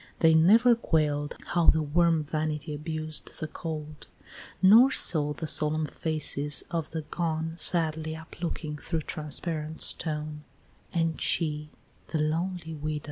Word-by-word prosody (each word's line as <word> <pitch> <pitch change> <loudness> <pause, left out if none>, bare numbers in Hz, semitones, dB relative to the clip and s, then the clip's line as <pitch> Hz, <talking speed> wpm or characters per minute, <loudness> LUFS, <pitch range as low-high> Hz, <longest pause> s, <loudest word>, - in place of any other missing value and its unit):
They 160 -1 +4
never 220 +10 +6
quail'd 150 -9 0
How 175 -1 +1
the 160 - +5
warm 165 +1 +2
vanity 155 0 -3
abused 155 +1 -3
the 155 - -3
cold; 155 -2 -7 0.5
Nor 225 +8 +7
saw 150 - +1
the 160 - -6
solemn 155 0 +1
faces 150 -2 0
of 165 -2 -2
the 160 -1 -5
gone 160 0 -3
Sadly 160 -2 +1
uplooking 160 -2 -6
through 165 -2 -2
transparent 155 +1 -3
stone: 150 -1 0 0.5
XIV. 160 -2 0
155 Hz, 110 wpm, -27 LUFS, 150-165 Hz, 0.5 s, Nor